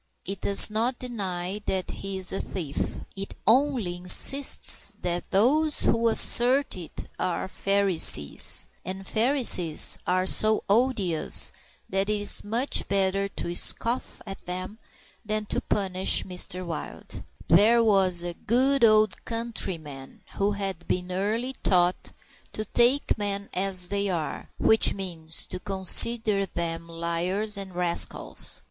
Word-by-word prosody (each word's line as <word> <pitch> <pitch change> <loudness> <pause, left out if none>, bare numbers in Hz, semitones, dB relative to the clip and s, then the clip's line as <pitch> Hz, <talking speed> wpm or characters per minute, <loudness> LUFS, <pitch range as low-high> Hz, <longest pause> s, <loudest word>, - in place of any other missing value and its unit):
It 195 0 -7
does 200 +1 +5
not 235 +4 -1
deny 195 -5 -4
that 190 -1 -2
he 195 0 -7
is 185 0 +2
a 195 - -3
thief. 155 -6 -6
It 195 0 -7
only 235 -6 +1
insists 265 +10 +4
that 175 -1 -5
those 290 +10 +1
who 230 0 +1
assert 255 +5 +4
it 175 -4 -8
are 180 - -3
Pharisees 190 - +3 0.2
and 190 +1 -7
Pharisees 220 - +3
are 185 +1 0
so 215 +3 +2
odious 205 -7 +1 0.4
that 195 +2 -2
it 210 -1 -1
is 205 - +1
much 235 +6 0
better 195 0 0
to 170 -3 -5
scoff 235 +7 -2
at 195 -2 -9
them 185 +4 -7 0.4
than 215 0 -2
to - - -3
punish 190 -2 -1
Mr. 180 0 -1
Wild. 165 -2 -8 0.2
There 220 +8 +4
was 190 -5 +3
a 175 0 -4
good 260 +8 0
old 215 -3 +2
countryman 175 - -4
who 200 +1 -1
had 195 -4 -6
been 180 0 -3
early 215 +7 -3
taught 180 -1 0 0.4
to 215 - -5
take 240 +4 +1
men 200 -1 -4
as 185 -1 +2
they 200 0 -1
are, 165 -4 -5
which 220 - +4
means 165 -5 -2
to - - -8
consider 200 +2 +1
them 165 -1 -5
liars 170 +6 -2
and 195 -2 -5
rascals. 175 -1 -1
195 Hz, 130 wpm, -24 LUFS, 180-220 Hz, 0.4 s, does